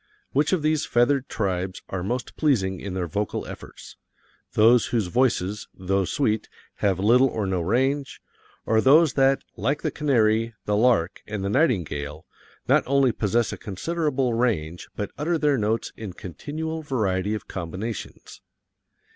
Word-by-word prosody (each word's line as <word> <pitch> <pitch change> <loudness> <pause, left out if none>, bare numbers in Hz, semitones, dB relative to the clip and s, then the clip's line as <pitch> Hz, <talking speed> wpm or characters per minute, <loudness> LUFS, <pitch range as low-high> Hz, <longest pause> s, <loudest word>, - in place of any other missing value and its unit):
Which 145 +2 +2
of 180 -5 +1
these 155 0 +2
feathered 130 +3 +2
tribes 95 -3 -2
are 95 - -3
most 120 +7 -3
pleasing 95 - +1
in 95 -2 -5
their 90 -2 -1
vocal 100 +5 -3
efforts: - - -11 0.6
those 115 +2 +5
whose 115 -4 0
voices, 105 -1 0
though 95 +1 0
sweet, 110 -1 0 0.3
have 100 -3 +1
little 120 +7 +5
or 110 -5 -2
no 95 -2 -1
range, 135 - 0 0.5
or 110 0 +3
those 150 +2 +5
that, 135 0 +3
like 145 +2 -1
the - - 0
canary, 115 -5 +1
the 105 - +1
lark, 105 -6 +2
and 105 -2 -4
the - - 0
nightingale, 90 - 0 0.4
not - - +4
only 135 -1 +3
possess 115 +2 0
a - - -6
considerable 135 - -1
range 95 -9 -1
but 105 - -4
utter 165 +3 +1
their 150 -4 +2
notes 110 +2 -1
in 105 -5 -7
continual 155 - -5
variety 105 -8 -1
of 105 - -7
combinations? 95 +5 -6
115 Hz, 150 wpm, -24 LUFS, 95-135 Hz, 0.6 s, those